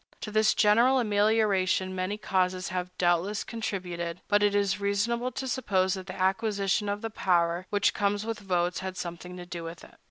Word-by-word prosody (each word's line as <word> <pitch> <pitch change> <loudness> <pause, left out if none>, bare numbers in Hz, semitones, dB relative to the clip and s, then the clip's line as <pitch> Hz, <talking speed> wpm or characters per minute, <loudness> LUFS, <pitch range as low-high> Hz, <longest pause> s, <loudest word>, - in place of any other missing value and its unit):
To 210 - -5
this 215 0 +3
general 235 +5 +4
amelioration 205 -4 +2
many 185 +2 -2
causes 185 -3 0
have 180 0 -3
doubtless 175 +4 +1
contributed; 180 -6 -4
but 205 0 +3
it 205 0 +3
is 200 0 +1
reasonable 230 +5 0
to 265 - -4
suppose 190 -7 +1
that 190 -1 -6
the 185 0 -7
acquisition 200 +1 +1
of 205 +1 -2
the 225 - -3
power 175 -2 +1
which 205 -1 +2
comes 205 +1 0
with 225 -1 -3
votes 180 -3 0
has 190 - -5
had 185 0 -6
something 180 +1 -6
to 175 - -8
do 175 -1 -6
with 165 0 -8
it. - - -15
195 Hz, 190 wpm, -28 LUFS, 180-210 Hz, -, general